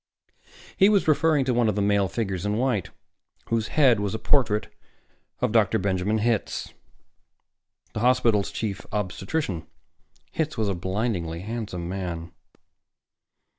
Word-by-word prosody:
He 195 - +6
was 200 -5 +3
referring 155 -2 +3
to 125 - +1
one 120 -2 +3
of 105 - -1
the 105 - 0
male 100 -1 +3
figures 95 -2 -3
in 105 +1 0
white, 120 -6 0 0.6
whose 115 -1 0
head 130 -8 +4
was 105 +1 -2
a - - -1
portrait 110 -5 +1 0.7
of 125 -3 +1
Dr. 110 -4 +3
Benjamin 95 +2 0
Hitz, 115 -1 -1 1.2
the - - -3
hospital's 120 -4 +3
Chief 105 -4 -4
Obstetrician. 95 - -2 0.6
Hitz 155 -4 -2
was 110 -2 +1
a - - +1
blindingly 95 -3 -2
handsome 105 -5 -4
man. 85 -3 -4
105 Hz, 135 wpm, -25 LUFS, 95-120 Hz, 1.2 s, He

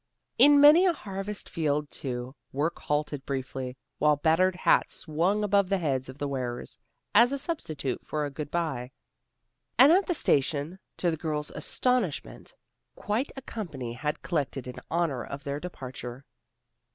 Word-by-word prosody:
In 290 0 +8
many 305 +6 +8
a 355 - +4
harvest 195 - -6
field, 150 -2 -1
too, 125 -1 -5 0.2
work 150 +5 -1
halted 150 -1 -2
briefly, 130 -1 -4 0.2
while 150 0 +4
battered 165 +5 +3
hats 180 - +2
swung 175 +7 0
above 200 -2 +3
the 195 - +2
heads 135 -7 -1
of 130 - -9
the 145 - -2
wearers, 125 -3 -4 0.3
as 235 +4 +6
a 280 - -1
substitute 155 - -4
for 150 -1 -2
a 145 - -5
good 145 0 -5
by. 150 -8 -2 0.9
And 275 +4 +8
at 375 +3 +4
the 355 - +1
station, 145 - +1 0.2
to 175 - +1
the 160 - -3
girls' 150 -2 -2
astonishment, 215 - -1 0.4
quite 220 +7 -1
a 270 - -8
company 145 - -5
had 150 +4 -3
collected 140 -6 -2
in 125 - -7
honor 160 -7 0
of 140 0 -7
their 140 0 -3
departure. 130 -6 -7
150 Hz, 155 wpm, -28 LUFS, 135-195 Hz, 0.9 s, In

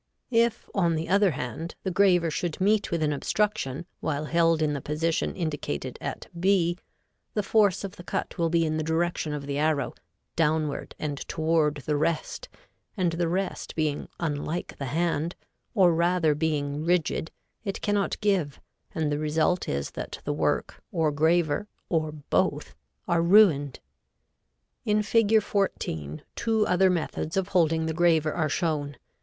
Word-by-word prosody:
If, 230 -1 +2
on 170 -4 +2
the 160 +1 -2
other 200 +2 +4
hand, 155 +3 -5
the 190 - -1
graver 180 -3 +3
should 170 0 -3
meet 205 +2 +2
with 165 -2 0
an 150 -1 +1
obstruction 160 -3 -1
while 150 -1 -2
held 165 0 +3
in 150 -1 +1
the 140 - -3
position 160 +3 -1
indicated 150 - -3
at - - -5
B, 180 -2 +2 0.6
the 210 - +1
force 205 -3 +3
of 195 - -6
the 175 - -9
cut - - -3
will 165 -1 +2
be 165 0 +2
in 155 0 -1
the 155 - -1
direction 160 0 0
of 145 -1 -4
the 140 0 -2
arrow, 155 -2 +1 0.4
downward 155 -2 0
and 145 -2 -3
toward 155 -3 +1
the 150 - +1
rest, 165 - -1 0.5
and 180 -3 +2
the 170 +1 0
rest 185 +3 -3
being 155 -2 -1
unlike 155 +1 -3
the 140 - -3
hand, 165 +2 0 0.4
or 185 -5 +5
rather 170 -1 +2
being 150 -1 -1
rigid, 165 -1 +1 0.3
it 195 -2 -3
cannot 205 -1 0
give, 190 -9 +1 0.4
and 155 -2 0
the 145 - 0
result 155 +4 +1
is 70 0 -2
that - - -6
the - - 0
work, - - -1
or 160 -2 +1
graver, 160 +5 +2 0.2
or 155 -2 0
both, 150 -2 -1 0.3
are 170 -1 +2
ruined. 170 -7 +5 1.0
In 210 0 +2
Fig. 220 0 +3
14 80 - -2
two 220 -2 +1
other 185 +1 +4
methods 170 -1 -2
of 190 0 0
holding 165 -3 +2
the 160 - -1
graver 160 -2 +3
are 155 -3 0
shown. 145 -4 -1
165 Hz, 160 wpm, -27 LUFS, 150-180 Hz, 1.0 s, or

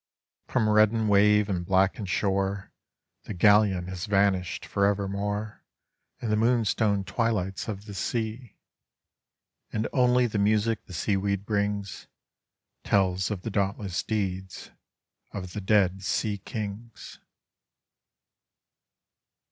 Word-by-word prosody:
Prom 120 -4 +1
reddened 110 +1 +3
wave 105 +1 +4
and 90 -4 -2
blackened 95 +2 +1
shore 95 +1 -1 0.5
The 105 - -6
galleon 100 -1 +4
has 95 +2 -5
vanished 95 -4 +1
forever 100 0 +1
more 105 +2 -4 0.6
In 115 - -3
the - - +3
moonstone 110 -3 +2
twilights 95 -4 -2
of 105 -2 -5
the 105 - -8
sea; 110 +4 -4 1.2
And 110 0 -1
only 125 -1 +4
the 110 -3 -2
music 105 +2 +1
the - - -10
seaweed 100 +2 -1
brings 100 -2 -2 0.8
Tells 95 -2 +1
of 100 -4 -4
the 115 - -4
dauntless 100 -2 -1
deeds 95 -4 -4 0.6
of 90 -3 -6
the 105 - -4
dead 95 -2 +2
seakings. 105 +2 -4
100 Hz, 110 wpm, -27 LUFS, 95-110 Hz, 1.2 s, wave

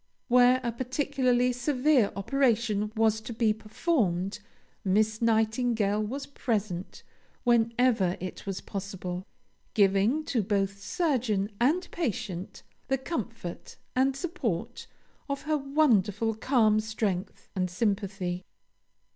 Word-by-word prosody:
Where 250 +1 +6
a 240 - 0
particularly 255 0 +1
severe 255 -1 +2
operation 220 -2 +1
was 220 0 +2
to 220 - -7
be 220 -1 +2
performed, 210 - -1 0.4
Miss 215 +3 +2
Nightingale 220 -2 +2
was 265 +6 -3
present 210 -9 -3 0.4
whenever 230 -5 +3
it 185 +2 -7
was 195 -1 -3
possible, 190 -2 -5 0.5
giving 205 +8 +3
to 240 - +1
both 200 0 -1
surgeon 225 - 0
and 300 +10 +2
patient 215 - -4 0.2
the 270 - +1
comfort 230 - -5 0.2
and 265 +1 +3
support 275 - -3 0.4
of 280 0 -3
her 305 -1 0
wonderful 235 -7 +2
calm 220 -2 +3
strength 215 -3 -3
and 185 -1 0
sympathy. 195 -2 -1
220 Hz, 105 wpm, -28 LUFS, 200-255 Hz, 0.5 s, Where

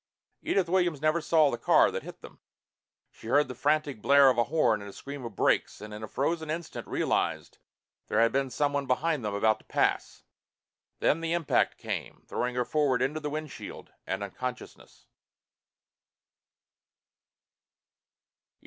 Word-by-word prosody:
Edith 190 -3 +1
Williams 175 -4 +1
never 155 +3 +1
saw 155 -2 +3
the 120 - -4
car - - +4
that - - -4
hit - - -11
them. - - -13 0.7
She - - -13
heard 145 +4 +3
the 130 - -6
frantic 145 -1 0
blare 140 +1 +6
of 125 - -3
a 120 - +3
horn 115 -10 +2
and 100 - -8
a - - -11
scream 140 -1 -8
of 115 -4 -7
brakes, - - +1
and 105 +1 -9
in 105 - -7
a 110 - -5
frozen 160 +6 -2
instant 165 +1 -5
realized - - -1
that - - -55
there 105 - +1
had 115 0 +4
been 135 +1 0
someone 145 0 -1
behind 150 +1 0
them, 105 -1 -2
about 110 +1 +2
to - - -23
pass. - - -1 0.8
Then 165 - +2
the 165 0 -1
impact 170 -4 +1
came, - - -5
throwing 125 0 -2
her 125 -1 0
forward 135 -4 +1
into 150 +4 -1
the 150 -1 -4
windshield 155 -1 -7 0.2
and 95 +1 -2
unconsciousness. 125 +5 -7
140 Hz, 160 wpm, -28 LUFS, 120-155 Hz, 0.8 s, blare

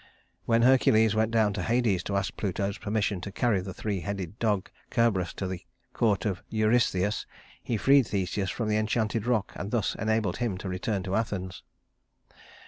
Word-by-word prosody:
When 115 0 +3
Hercules 110 -4 +5
went 110 0 +2
down 110 -3 +2
to - - -3
Hades 115 -6 +1
to 100 - -1
ask 100 0 -2
Pluto's 100 0 -2
permission 105 -2 -1
to 100 - -6
carry 110 -2 +1
the 95 +1 -6
three 100 +1 -3
headed 100 +1 -5
dog 105 -4 0 0.2
Cerberus 100 -7 +1
to 95 - -3
the 90 -1 -5 0.3
court 105 -5 +1
of 95 -4 -1
Eurystheus, 110 -3 +1 0.3
he 115 - -2
freed 135 +2 +5
Theseus 95 0 -1
from 115 - -2
the 105 0 +2
enchanted 110 0 0
rock 115 -5 +1
and 100 - -5
thus 115 -2 0
enabled 110 -4 0
him 115 -6 -1
to 95 - -6
return 95 +2 -2
to 95 +1 -2
Athens. 95 -4 -3
105 Hz, 175 wpm, -28 LUFS, 95-115 Hz, 0.3 s, Hercules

